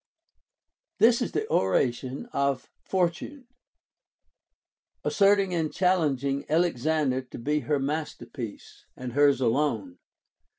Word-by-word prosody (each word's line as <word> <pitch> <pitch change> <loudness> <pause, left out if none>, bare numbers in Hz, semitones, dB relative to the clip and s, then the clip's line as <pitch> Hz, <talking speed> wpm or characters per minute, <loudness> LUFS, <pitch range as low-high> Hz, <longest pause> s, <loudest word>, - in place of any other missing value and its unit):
1. - - +7
This 235 +1 0
is - - -1
the 435 +1 -1
oration 125 - 0
of 140 -2 -1
Fortune, 190 - -2 1.6
asserting 195 -2 +3
and 160 -3 0
challeng 165 -8 +1
ing 140 0 -1
Alexander 155 -4 +1
to 125 - -11
be 150 +5 0
her 150 0 0
masterpiece, 135 -6 -6
and 125 -1 -6
hers 140 -1 +4
alone. 115 - 0
145 Hz, 110 wpm, -27 LUFS, 125-175 Hz, 1.6 s, 1